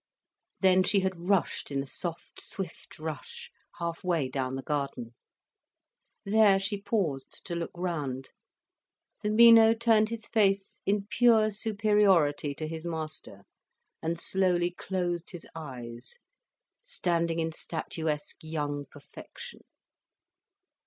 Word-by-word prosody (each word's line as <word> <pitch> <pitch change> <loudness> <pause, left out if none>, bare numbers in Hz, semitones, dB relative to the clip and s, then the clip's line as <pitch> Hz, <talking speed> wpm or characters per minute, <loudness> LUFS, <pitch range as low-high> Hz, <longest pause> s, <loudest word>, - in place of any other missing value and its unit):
Then 185 -1 +5
she 195 +1 +3
had 185 -2 -3
rushed 195 -7 +1
in 140 -1 -1
a - - -9
soft 165 +4 -5
swift 185 -4 -6
rush, 155 -1 -7 0.3
half 170 -1 -4
way 165 -7 0
down 130 -1 -2
the 135 - -5
garden. 140 -5 -3 1.1
There 205 -1 +5
she 200 +1 -2
paused 165 - -2
to 175 - -4
look 170 -1 -3
round. 150 -7 -3 0.9
The 210 - -1
Mino 225 0 +8
turned 225 -2 +3
his 230 -1 -5
face 195 -3 +1
in 200 0 +1
pure 225 -2 +4
superiority 200 -9 +2
to 155 - -4
his 160 0 -6
master, 155 - -6 0.6
and 165 +1 -2
slowly 180 -2 +1
closed 175 -2 -3
his 175 - -8
eyes, 125 - -8 0.6
standing 170 - -1
in 165 0 -1
statuesque 160 -2 -3
young 145 -2 -3
perfection. - - -12
175 Hz, 120 wpm, -29 LUFS, 150-200 Hz, 1.1 s, Mino